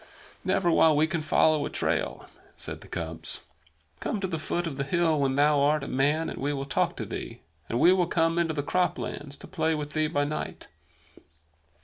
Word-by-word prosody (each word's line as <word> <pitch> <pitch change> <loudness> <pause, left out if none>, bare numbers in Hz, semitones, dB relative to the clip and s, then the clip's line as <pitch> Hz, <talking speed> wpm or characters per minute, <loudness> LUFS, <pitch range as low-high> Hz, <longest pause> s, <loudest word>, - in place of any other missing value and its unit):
"Never 175 -2 +2
while 160 -2 +5
we 155 - +5
can 160 0 -2
follow 155 0 +3
a - - -3
trail," - - -1 0.3
said - - -7
the - - -13
cubs. 80 -1 -5 0.6
"Come 215 - -2
to 195 - -2
the 165 -3 -3
foot 175 +3 -2
of 160 -4 -4
the 140 - 0
hill 160 +1 +2
when 135 -1 +1
thou 145 +1 +4
art 145 +1 +2
a - - -5
man, 145 +5 +1
and - - -5
we 145 +2 -1
will 135 -1 -3
talk 140 - 0
to - - -3
thee; - - -6 0.3
and 120 - 0
we 175 +6 +7
will 180 -2 +2
come 165 0 +2
into 165 -2 0
the 145 - -1
croplands 145 -4 -2
to - - -9
play 160 -3 0
with 150 -1 -5
thee 155 0 +2
by 145 -2 0
night." 150 +1 -4
155 Hz, 210 wpm, -27 LUFS, 145-165 Hz, 0.6 s, we